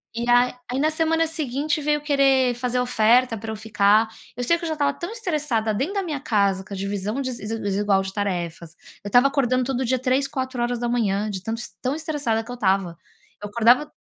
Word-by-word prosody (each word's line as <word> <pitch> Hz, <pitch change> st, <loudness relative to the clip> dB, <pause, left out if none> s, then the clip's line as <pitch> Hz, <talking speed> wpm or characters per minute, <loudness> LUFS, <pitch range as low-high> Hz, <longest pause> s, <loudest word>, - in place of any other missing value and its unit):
E 235 Hz, +1 st, -2 dB
aí 245 Hz, +1 st, +4 dB, 0.2 s
aí 255 Hz, -, -1 dB
na 310 Hz, +2 st, +2 dB
semana 325 Hz, +1 st, +1 dB
seguinte 300 Hz, -1 st, -2 dB
veio 295 Hz, +1 st, +1 dB
querer 270 Hz, -3 st, +3 dB
fazer 250 Hz, +1 st, -2 dB
oferta 245 Hz, 0 st, +3 dB
para 220 Hz, +1 st, -6 dB
eu -, -, -4 dB
ficar, 215 Hz, 0 st, +3 dB, 0.3 s
eu 245 Hz, -, -2 dB
sei 335 Hz, -, +3 dB
que -, -, -12 dB
eu -, -, -2 dB
já 315 Hz, -, -1 dB
estava 285 Hz, -2 st, +1 dB
tão 345 Hz, +4 st, -6 dB
estressada 300 Hz, -, -1 dB
dentro 285 Hz, -, -2 dB
da 395 Hz, -, 0 dB
minha 305 Hz, -5 st, -3 dB
casa 200 Hz, -6 st, +1 dB
com 200 Hz, +1 st, -8 dB
a -, -, -6 dB
divisão 200 Hz, +4 st, -3 dB
desi 225 Hz, -3 st, -4 dB
desigual 200 Hz, -1 st, +1 dB
de 190 Hz, -, -6 dB
tarefas, 175 Hz, -5 st, -3 dB, 0.3 s
eu -, -, -6 dB
estava 245 Hz, +6 st, +5 dB
acordando 255 Hz, -3 st, +1 dB
todo 260 Hz, 0 st, -1 dB
dia 260 Hz, +1 st, +1 dB
3h 260 Hz, +2 st, +1 dB
4h 240 Hz, -5 st, -1 dB
de 195 Hz, -3 st, -4 dB
tanto 225 Hz, +4 st, -3 dB
es 240 Hz, -, -7 dB
tão 260 Hz, +3 st, -1 dB
estressada 290 Hz, -8 st, -1 dB
que 245 Hz, -, -10 dB
eu -, -, -5 dB
estava. 190 Hz, -6 st, 0 dB, 0.5 s
Eu 205 Hz, -, -6 dB
acordava 240 Hz, +6 st, +3 dB
245 Hz, 210 wpm, -23 LUFS, 210-275 Hz, 0.5 s, estava